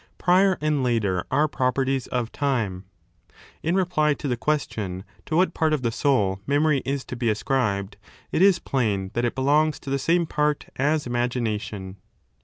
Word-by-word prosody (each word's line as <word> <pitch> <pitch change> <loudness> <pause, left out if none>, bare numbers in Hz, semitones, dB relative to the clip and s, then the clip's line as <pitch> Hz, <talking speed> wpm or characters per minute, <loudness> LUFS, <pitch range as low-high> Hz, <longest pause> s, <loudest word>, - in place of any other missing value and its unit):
Prior 185 +1 +3
and 150 -2 +1
later 110 -8 0
are 150 +1 +2
properties 130 0 0
of 120 -2 -2
time. 110 -10 -1 0.8
In 170 +3 0
reply 160 -6 +2
to 145 - -5
the 125 - 0
question 110 -8 -2 0.2
to 155 - -1
what 185 +3 +3
part 160 -2 +1
of 145 -4 -1
the 115 - +1
soul 105 -8 +1
memory 145 0 +2
is 135 -1 -2
to - - -6
be 120 -1 0
ascribed, 105 -4 -1 0.3
it - - +1
is 195 -1 +6
plain 105 - -1
that 120 +1 0
it 120 - -1
belongs 150 +3 +2
to 135 - -6
the 140 - +1
same 170 +4 +2
part 150 -1 0
as 150 +2 +1
imagination. 110 -5 -2
135 Hz, 170 wpm, -24 LUFS, 115-150 Hz, 0.8 s, is